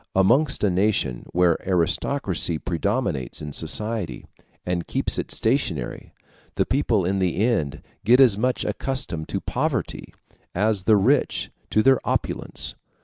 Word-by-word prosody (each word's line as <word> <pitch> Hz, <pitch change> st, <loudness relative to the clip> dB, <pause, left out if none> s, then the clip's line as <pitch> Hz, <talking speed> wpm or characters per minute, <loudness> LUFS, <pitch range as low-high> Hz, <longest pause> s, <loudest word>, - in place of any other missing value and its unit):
Amongst 130 Hz, +11 st, +3 dB
a 100 Hz, -, +3 dB
nation 90 Hz, -, 0 dB
where 90 Hz, -2 st, +3 dB
aristocracy 90 Hz, -, 0 dB
predominates 85 Hz, -, -2 dB
in 75 Hz, -2 st, -6 dB
society, 110 Hz, 0 st, -1 dB, 0.4 s
and 90 Hz, -1 st, -2 dB
keeps -, -, -1 dB
it -, -, -4 dB
stationary, 110 Hz, -, -1 dB, 0.4 s
the -, -, +1 dB
people 115 Hz, -8 st, +1 dB
in 95 Hz, +2 st, 0 dB
the 90 Hz, -2 st, 0 dB
end 100 Hz, -, 0 dB, 0.2 s
get 120 Hz, +5 st, +5 dB
as 125 Hz, -7 st, +6 dB
much 125 Hz, +5 st, 0 dB
accustomed 95 Hz, -12 st, -3 dB
to -, -, -2 dB
poverty -, -, -3 dB, 0.4 s
as 100 Hz, 0 st, +1 dB
the 110 Hz, -2 st, +5 dB
rich 130 Hz, +8 st, +1 dB, 0.2 s
to 110 Hz, -, +2 dB
their 135 Hz, -1 st, +5 dB
opulence. -, -, -2 dB
100 Hz, 135 wpm, -23 LUFS, 85-120 Hz, 0.4 s, as